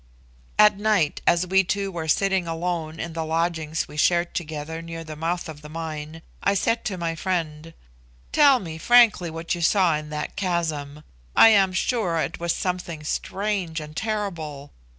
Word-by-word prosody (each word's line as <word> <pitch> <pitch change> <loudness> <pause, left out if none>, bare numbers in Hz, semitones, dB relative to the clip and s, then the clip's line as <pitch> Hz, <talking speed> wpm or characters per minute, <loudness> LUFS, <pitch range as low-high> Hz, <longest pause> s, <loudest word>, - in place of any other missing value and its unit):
At 210 -1 +6
night, 205 -8 +1
as 175 +1 +4
we 190 +1 +3
two 195 +1 -2
were 165 -3 -5
sitting 190 +2 +1
alone 165 -1 -3
in 165 0 -4
the 165 0 -2
lodging 160 -1 -1
we 150 - -11
shared 175 +2 +2
together 160 0 -5
near 165 0 -7
the 155 -1 -8
mouth 170 +3 -2
of 150 -2 -9
the 150 - -11
mine, 160 0 -6 0.2
I 200 - +2
said 230 +4 +1
to 190 - -2
my 170 -1 -2
friend, 165 -2 -3 0.6
"Tell 285 -3 +6
me 165 -7 -7
frankly 230 -4 +5
what 165 +1 -3
you 175 - -4
saw 175 -1 +3
in 150 0 -5
that 150 -1 -5
chasm: 155 -6 -2 0.3
I - - +9
am 195 -3 +4
sure 190 -2 0
it 160 - -2
was 170 0 0
something 180 -4 -3
strange 190 0 -2
and 155 0 -9
terrible. 170 -10 -4
170 Hz, 170 wpm, -24 LUFS, 160-190 Hz, 0.6 s, I